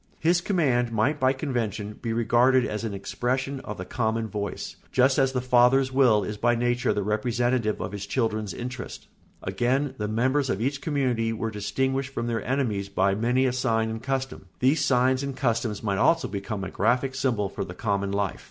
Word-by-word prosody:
His 175 +2 +2
command 135 - +1
might 115 +7 +1
by 130 0 +4
convention 115 -7 -3
be 115 - -2
regarded 120 +3 +3
as 105 +1 -3
an 110 -3 -3
expression 130 +7 -2
of 105 -4 -7
the 90 - -6
common 115 -1 -1
voice, 105 -2 -5
just 130 +1 +3
as 135 -1 +3
the 125 -1 -1
father's 125 +2 +4
will 125 -6 +4
is 105 +2 -4
by 120 +2 +2
nature 120 +1 +1
the 105 - -1
representative 115 +2 0
of - - -4
his 100 -1 -6
children's 110 -4 -1
interests. 125 0 -6 0.4
Again, 125 +8 0
the 105 - -1
members 130 +6 +1
of 95 - 0
each 135 +4 -1
community 125 -7 0
were 115 0 -3
distinguished 135 +6 -2
from 115 - -2
their 115 -1 -2
enemies 115 -7 -1
by 100 0 +2
many 120 +5 +1
a 125 - +1
sign 115 -3 0
and 110 0 -5
custom; 135 -6 -3
these 135 +5 +2
signs 130 0 +3
and 140 -1 -4
customs 115 -4 -1
might 100 -3 0
also 165 - +3
become 100 0 -4
a 95 - -5
graphic 125 +5 +1
symbol 125 -7 0
for 100 - -5
the 90 -2 -8
common 100 -2 -1
life. 100 -2 -1
120 Hz, 190 wpm, -26 LUFS, 105-130 Hz, 0.4 s, by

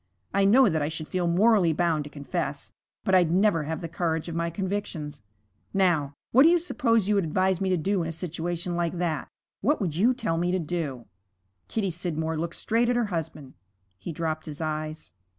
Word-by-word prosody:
I 200 0 +3
know 245 +6 +6
that 160 -5 +1
I 145 - 0
should 160 -1 -5
feel 180 -2 -1
morally 185 -1 +4
bound 160 -2 +1
to - - -8
confess, 145 0 -4 0.3
but 190 - 0
I'd 180 -3 +5
never 180 -3 +3
have 160 +1 -3
the 165 - -4
courage 165 -1 -2
of 170 - -5
my 170 +1 -1
convictions. 170 - -4 0.5
Now, 160 -7 +2 0.2
what 255 - +6
do 310 - +8
you 350 - +5
suppose 230 - +1
you 210 - +3
would 200 -2 +2
advise 185 +3 +1
me 190 - +1
to 185 - +2
do 190 +3 0
in 165 - -2
a - - -2
situation 175 +1 -3
like 175 0 -1
that? 165 -4 -1 0.3
What 290 +9 +2
would 175 -8 -2
you 235 +9 +3
tell 165 -9 -1
me 175 +1 +1
to - - +2
do?' 155 -8 -3 0.6
Kitty 200 -4 -1
Scidmore 160 -2 -2
looked 170 +1 -3
straight 230 +2 +1
at 245 - +2
her 240 -1 +2
husband. 155 -5 -4 0.5
He 170 - -5
dropped 160 0 -3
his 150 -1 -7
eyes. 155 0 -4
170 Hz, 205 wpm, -26 LUFS, 160-195 Hz, 0.6 s, do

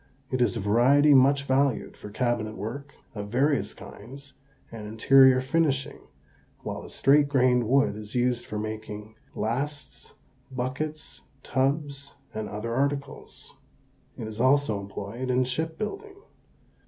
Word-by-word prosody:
It 130 -1 0
is 120 -1 +2
a - - -2
variety 125 +8 +4
much 140 +1 +5
valued 135 -2 0
for 105 - -10
cabinet 110 -1 -1
work 130 +8 -7 0.2
of 105 -2 -6
various 140 +5 +1
kinds 135 +6 -12 0.4
and 110 -2 -8
interior 130 +4 +5
finishing, 140 0 0 0.6
while - - -5
the - - -11
straight 145 +2 +3
grained 125 -4 +2
wood 140 -4 +3
is 105 +1 -7
used 125 -1 0
for 105 - -5
making 110 0 -6 0.2
lasts, 140 +7 -4 0.4
buckets, 135 +5 -5 0.2
tubs, 140 +1 -2 0.2
and 110 -1 -4
other 105 +3 -4
articles. 140 +2 -3 0.6
It 110 - -5
is 110 +1 -5
also 130 -5 +3
employed 100 +5 -6
in 125 0 +3
ship 160 +6 -3
building. 390 - -5
130 Hz, 130 wpm, -26 LUFS, 110-140 Hz, 0.6 s, much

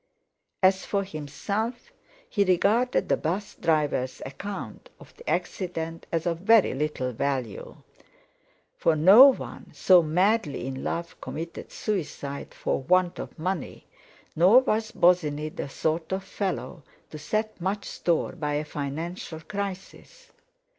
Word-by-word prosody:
As 190 0 +4
for 200 -1 -1
himself, 200 - -4 0.3
he 205 - +2
regarded 205 +7 +2
the - - +2
bus 185 +6 -3
driver's 150 -6 0
account 195 +9 -7
of - - -16
the 475 - -8
accident 165 -3 -3
as 165 -1 -1
of 170 -1 -1
very 220 +2 +5
little 135 -2 -2
value. 125 -3 -3 1.0
For 160 - +2
no 195 - +9
one 270 - -2
so 185 -2 +6
madly 180 - +1
in 130 0 -5
love 170 0 -4
committed 165 +2 -7
suicide 150 -8 -4
for - - -1
want 180 +4 +2
of - - -7
money; 175 -1 -4 0.5
nor 190 +10 +7
was 220 -3 -1
Bosinney 155 -4 +2
the 145 - -6
sort 160 +4 -2
of 190 0 -2
fellow 190 -3 -4 0.3
to 155 - -7
set 215 +5 -2
much 195 +3 -2
store 170 -2 0
by 150 -1 -3
a 150 +1 -1
financial 160 +4 -5
crisis. 200 - -7
175 Hz, 130 wpm, -26 LUFS, 155-200 Hz, 1.0 s, no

